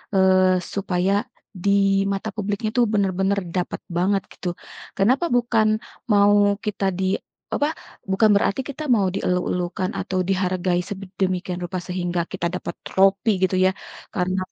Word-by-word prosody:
eee, 185 -1 +4
supaya, 190 -1 0 0.5
di 200 -1 +3
mata 200 +2 -2
publiknya 205 +1 -2
itu 245 - +2
benar-benar 195 -1 +1
dapat 175 +1 -3
banget 185 +3 +1
gitu. 175 -1 -5 0.4
Kenapa 250 - +3
bukan 235 -3 +3 0.4
mau 205 -1 +4
kita 205 -2 -2
di 190 0 +1 0.3
apa 290 - +1 0.4
bukan 195 +3 +3
berarti 200 +5 +1
kita 285 +3 -6
mau 205 -7 +3
dieluk-elukan 180 0 -1
atau 185 -1 -1
dihargai 185 -1 0
sedemikian 185 -1 -3
rupa 180 0 -4
sehingga 175 -1 -2
kita 170 0 -3
dapat 170 -2 -5
tropi 195 +3 +3
gitu 185 0 +2
ya, 185 0 +4 0.4
karena 185 +1 0
190 Hz, 130 wpm, -23 LUFS, 180-205 Hz, 0.5 s, eee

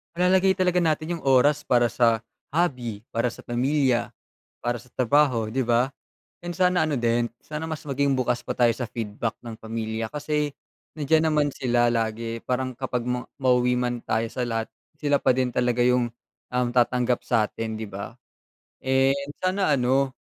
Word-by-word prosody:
malalagay 185 +2 +4
talaga 180 -1 +2
natin 160 0 0
yung - - -16
oras 135 +2 +4
para 120 -1 +3
sa 115 -2 +3 0.3
hobby, 125 -11 -1
para 115 +2 +1
sa - - -7
pamilya, 130 0 +1 0.5
para 120 -1 -2
sa 125 - -20
trabaho, 125 -2 +2
di 130 - +1
ba? 120 +3 +2 0.5
And 175 0 -5
sana 180 -3 +3
ano 150 - 0
din, 120 0 +1
sana 155 +1 -5
mas 155 -2 -5
maging 140 0 +1
bukas 125 -1 0
pa - - -2
tayo 120 -2 +4
sa 120 +1 -4
feedback 115 0 -4
ng 115 -2 -7
pamilya 110 0 -3
kasi 150 0 -2 0.4
nandiyan 160 +2 +2
naman 150 -2 +2
sila 120 -2 +2
lagi 115 0 -2
parang 130 +1 -2
kapag 125 -1 -3
ma 125 0 -1 0.2
mauwi 125 -1 +3
man 120 -1 -1
tayo 110 +1 0
sa 125 - -2
lahat 115 -2 -1 0.3
sila 145 -1 +1
pa - - +3
din 130 0 +1
talaga 125 -1 +1
yung, 125 -1 +3 0.4
um, 125 -1 +1
tatanggap 125 0 +2
sa'tin 110 -1 -1
di 110 - -4
ba? 100 +4 -7 0.7
Eh, 130 +1 +3 0.3
sana 185 -2 +1
ano, 130 +1 +2
125 Hz, 165 wpm, -25 LUFS, 120-145 Hz, 0.7 s, malalagay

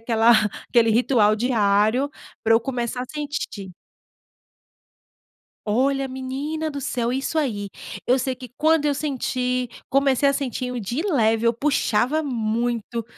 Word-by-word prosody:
aquela 225 0 +4 0.4
aquele 230 -2 +4
ritual 220 -2 +3
diário, 220 +3 +2 0.3
para 225 0 +4
eu 225 - +4
começar 245 0 -3
a - - -4
sentir. 290 -10 -5 2.0
Olha, 270 +5 +1
menina 275 +5 -4
do 285 -1 -5
céu, 245 -3 -1
é - - 0
isso 275 +4 -2
aí. 210 -9 -1 0.4
Eu 255 +2 +4
sei 260 0 -1
que 250 0 -10
quando 315 -1 +3
eu 290 - +2
senti 255 -3 -1 0.2
comecei 275 0 +3
a 275 - +3
sentir 255 -2 -3
o 245 - -3
de 235 +9 -3
leve, 230 - +2
eu 230 - +4
puxava 275 +2 +1
muito. 235 -2 -2
250 Hz, 140 wpm, -23 LUFS, 230-275 Hz, 2.0 s, aquela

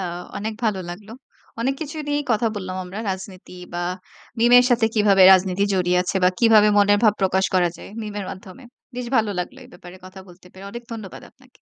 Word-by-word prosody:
আ - - -3 0.3
অনেক 215 +2 -4
ভালো 210 -4 0
লাগলো। 205 +5 -10 0.5
অনেক 265 +3 0
কিছু 315 0 -6
নিয়েই 290 0 -1
কথা 230 +1 +1
বললাম 185 -2 -5
আমরা 190 +4 -8
রাজনীতি 190 -1 -8 0.2
বা 175 - -3 0.6
meme 240 +2 +4
এর 245 - +5
সাথে 235 -2 +3
কিভাবে 205 -3 +4
রাজনীতি 190 +1 +2
জড়িয়ে 180 -1 +1
আছে? 185 - -3
বা - - +6
কিভাবে 220 -3 +5
মনের 205 0 +4
ভাব 215 -2 +5
প্রকাশ 190 0 +1
করা 180 -1 +3
যায় - - -11
মিমের 205 -2 -5
মাধ্যমে? 195 +7 -12 0.3
বেশ 250 - -4
ভালো 220 -2 +1
লাগলো 180 - -5
এ - - -14
ব্যাপারে 180 +1 -13
কথা 185 +1 -12
বলতে 180 +1 -17
পেরে। 190 +1 -13
অনেক 235 +3 -8
ধন্যবাদ 215 -4 -9
আপনাকে। - - -25
200 Hz, 200 wpm, -21 LUFS, 185-225 Hz, 0.6 s, বা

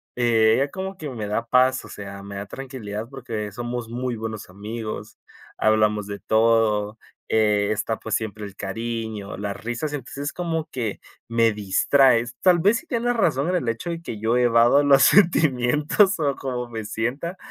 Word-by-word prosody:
ella 120 +2 +3
como 190 0 -5
que 150 -4 -6
me 110 -5 -5
da 115 +3 -1
paz, 130 +2 +3
o - - -12
sea, 100 -1 -8
me 100 0 -8
da 100 +1 -5
tranquilidad 115 -5 -6
porque 115 -6 -5
somos 120 +1 -5
muy 125 0 -3
buenos 110 -3 -6
amigos, 110 +3 -7 0.4
hablamos 105 -1 +2
de 100 0 -6
todo, 110 -1 +2 0.3
eh, 105 -2 +2
está, 110 +1 -1
pues, 110 - -2
siempre 105 -1 -4
el 100 -1 -10
cariño, 110 -3 -5
las 100 0 -5
risas, 120 +6 -3
entonces, 140 +1 -5
como 165 -3 -2
que 115 -5 -3 0.3
me 115 -1 +3
distrae. 115 +5 +3 0.2
Tal 180 -2 +5
vez 205 +7 +4
sí 345 - -18
tienes 245 -1 0
razón 165 - +1
el 130 -9 -1
hecho 115 +10 -3
de 165 0 -5
que 110 -10 -6
yo 115 +2 +1
evado 120 +3 +5
los 140 -1 +6
sentimientos 160 - +4
o 140 -3 +1
cómo 125 -3 -4
me 110 -2 -5
sienta. 140 - -3
115 Hz, 170 wpm, -23 LUFS, 110-140 Hz, 0.4 s, los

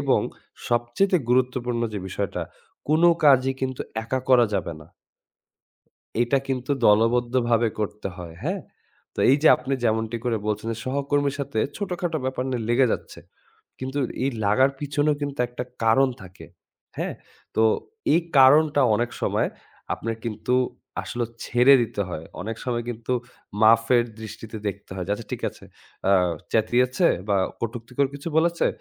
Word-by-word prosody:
এবং - - +2 0.5
সবচাইতে 120 +12 +2
গুরুত্বপূর্ণ 125 -1 +1
যে 105 - -2
বিষয়টা, 100 0 -3 0.5
কোনো 160 +3 +5 0.2
কাজই 135 -2 +5
কিন্তু 130 -1 -3 0.2
একা 130 +3 -1
করা 125 -2 +6
যাবে 85 - -1
না। 80 - -13 1.4
এটা 120 +3 +2
কিন্তু 130 0 -2 0.2
দলবদ্ধভাবে 120 +2 +3
করতে 105 -1 -3
হয়, 85 -2 -8
হ্যাঁ? - - -1 0.5
তো - - -15
এই 135 - +6
যে - - +7
আপনি 130 +2 -5
যেমনটি 110 0 0
করে 120 -2 +1
বলছেন 110 +1 -2
যে, 110 - -6
সহকর্মীর 140 +1 0
সাথে 140 -5 -3 0.2
ছোটখাটো 180 -5 -2
ব্যাপার 130 -1 -2
নিয়ে 120 -3 -2
লেগে 125 +2 +4
যাচ্ছে। - - -6 0.6
কিন্তু 130 +2 -4 0.3
এই 135 - +1
লাগার 130 +7 +4
পিছনেও 145 +1 +1
কিন্তু 140 -1 -4
একটা 120 0 -5 0.2
কারণ 130 +5 +4
থাকে, 95 0 -12 0.5
হ্যাঁ? - - -2 0.4
তো 110 - +4 0.5
এই 165 - +4 0.2
কারণটা 145 +2 +6
অনেক 120 +2 0
সময় - - +1 0.5
আপনার 115 +1 -4
কিন্তু 115 +3 -1 0.5
আসলেও 120 -2 -3 0.2
ছেড়ে 125 +3 +5
দিতে 110 -3 -4
হয়। 80 -2 -6 0.2
অনেক 115 +2 -4
সময় 120 -2 -2
কিন্তু 115 +1 -4 0.5
মাফের 115 +2 +5 0.2
দৃষ্টিতে 110 0 -8
দেখতে 100 0 -8
হয়। 95 -2 -4
যে 100 - 0
আচ্ছা, 115 +1 -9
ঠিক - - -4
আছে - - -16 0.4
আ 100 - +5 0.4
চ্যাতিয়েছে 125 - +2 0.2
বা 100 - +3 0.2
কটুক্তিকর 120 +4 -2
কিছু 140 +3 -5
বলেছে। 170 +1 +2
120 Hz, 145 wpm, -24 LUFS, 110-135 Hz, 1.4 s, যে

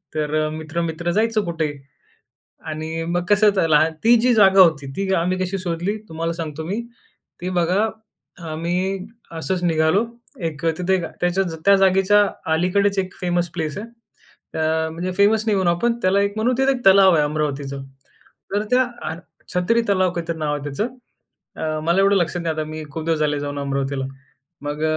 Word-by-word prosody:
तर 155 0 0
मित्र-मित्र 160 +2 -3
जायचं 215 +2 +1
कुठेही 160 -4 -2 0.9
आणि 160 +1 -4
मग 175 +1 0
कसं 205 -4 +4
लहान 155 +1 +4
ती 235 +1 +6
जी 250 0 +4
जागा 195 -3 +6
होती 160 -6 +4
ती 195 -1 -1
आम्ही 180 +2 0
कशी 185 +1 -1
शोधली 180 +3 -2
तुम्हाला 165 +1 -3
सांगतो 160 -2 -5
मी. 205 +7 -2 0.6
ती 180 - -3
बघा 185 +5 +1 0.6
आम्ही 180 +4 -2 0.2
असंच 180 +2 -3
निघालो. 165 +5 +2 0.4
एक 155 0 -6
तिथे 190 +1 +1 0.2
त्याच्या 180 +2 +2 0.2
त्या 200 - +7
जागेच्या 195 +2 +4 0.3
अलीकडेच 195 +4 +1
एक 185 -1 -3
फेमस 175 -1 0
प्लेस 160 -4 -3
आहे. 215 +3 -6 0.7
अ, 160 0 +1
म्हणजे 175 +3 -4
फेमस 210 +2 +4
नाही 215 -2 +2
होऊन 190 -2 +1
आपण 175 +8 +2
त्याला 190 0 +3
एक 200 0 0
म्हणून 235 +3 +1
तिथे 265 +1 +3
एक 250 -2 -4
तलाव 195 -1 +7
आहे 150 - +3
अमरावतीचं. 145 -2 -2 0.7
तर 205 +1 +1
त्या 255 +1 +5 0.3
अ - - -3 0.4
छत्री 205 +7 +2
तलाव 185 -2 +2
काहीतरी 170 -1 -3
नाव 150 -1 -1
आहे 145 - -6
त्याचं. 145 - -2 0.7
अ, 155 -1 -2
मला 170 +4 +2
एवढं 200 +1 +4
लक्षात 175 -1 0
नाही 165 -1 -1
आता 155 - -1
मी 155 0 -6
खूप 160 +1 -5
दिवस 165 -2 +1
झाले 150 -1 0
जाऊन 145 0 -4
अमरावतीला. 140 -1 -2 0.6
मग 145 +1 -4
175 Hz, 170 wpm, -21 LUFS, 155-195 Hz, 0.9 s, त्या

